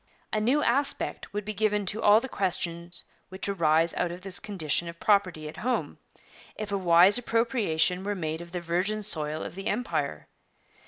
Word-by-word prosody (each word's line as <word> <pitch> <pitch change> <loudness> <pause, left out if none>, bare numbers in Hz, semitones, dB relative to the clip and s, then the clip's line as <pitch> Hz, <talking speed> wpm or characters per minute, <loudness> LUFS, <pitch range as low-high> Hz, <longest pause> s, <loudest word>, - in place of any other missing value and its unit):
'A 215 - +1
new 265 +7 +2
aspect 275 +3 -1
would 210 -1 -4
be 215 - -4
given 210 0 0
to 210 +4 -1
all 210 +1 +6
the 260 - -6
questions 175 -5 -3 0.3
which 190 +1 -4
arise 165 -3 +2
out 175 - -1
of 175 +1 -8
this 190 -2 -3
condition 175 -5 -1
of 170 0 -11
property 185 -7 +1
at 150 - -9
home, 250 +3 -2 0.6
if 215 -1 -6
a - - 0
wise 180 +4 +6
appropriation 225 -7 +1
were 205 +1 -2
made 160 -2 -3
of 170 0 -11
the 180 - -3
virgin 180 +5 -1
soil 155 -5 -2
of - - -7
the 195 +2 -6
Empire. 245 +4 -2
190 Hz, 180 wpm, -27 LUFS, 170-215 Hz, 0.6 s, all